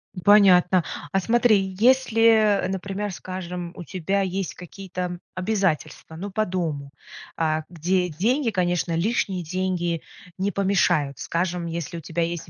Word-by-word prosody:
М, 180 - -6
понятно. 185 -3 +6 0.3
А 195 - +2
смотри, 205 -3 +2
если, 225 -5 +4
например, 195 +2 -3
скажем, 180 -1 -6
у 175 - -7
тебя 195 +3 -1
есть 190 -1 -3
какие-то 180 -1 -6 0.2
обязательства, 185 -5 -1
ну, 195 +4 -6
по 215 +2 0
дому, 155 -6 -3 0.5
э, 155 -1 +1
где 180 +2 0
деньги, 230 - +1
конечно, 175 -3 0
лишние 190 -1 0
деньги 175 -1 -2 0.4
не 195 +2 0
помешают. 175 -8 +1
Скажем, 175 0 -2
если 170 +1 -4
у - - -7
тебя 165 +3 -2
есть 165 -1 -4
185 Hz, 135 wpm, -24 LUFS, 170-200 Hz, 0.5 s, понятно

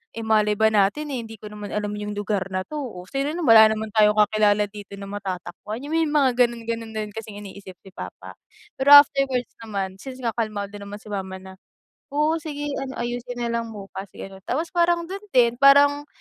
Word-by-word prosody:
Eh, 230 - -5
malay 215 -1 +2
ba 220 +1 +3
natin, 215 +9 +1
eh, 260 - -2
hindi 225 - -10
ko 210 0 -11
naman 210 -1 -7
alam 210 0 -2
yung 210 0 -5
lugar 205 -2 -2
na 185 -1 -3
'to. 300 +9 -6
Oh, 230 -10 -6
sino 275 - -3
nam 350 - -3
wala 225 -5 +8
naman 220 0 -3
tayong 210 0 +4
kakilala 210 0 +3
dito 205 -1 -10
na 200 0 -9
matatakbuhan." 200 +4 -6
Yung 290 - -7
may 325 -1 +2
mga 290 -3 +3 0.2
gano'n, 235 -1 -9
gano'n 230 -1 -4
na - - -2
rin 210 - -8
kasing 220 -1 -8
iniisip 195 -1 -11
si 195 - -14
papa. - - -9 0.5
Pero 285 +2 +8
afterwards 275 -3 +5
naman 195 -4 -5
since 260 -1 -9
nga 230 - +1
kalmado 210 -3 -3
naman 200 0 -8
si 210 - -11
mama 190 -1 -4
na, 190 0 -12 0.6
"Oo, 305 +2 +2
sige 295 -2 -6 0.2
ano 265 -1 -5
ayusin 245 0 -4
na 235 - -1
lang 230 -1 -6
bukas." 195 -1 -8
Gano'n. 195 0 -9
Tapos 320 +6 -2
parang 345 -1 +2
do'n 395 +2 -6
din 240 -1 +4
parang 285 +1 +5
220 Hz, 210 wpm, -23 LUFS, 205-270 Hz, 0.6 s, wala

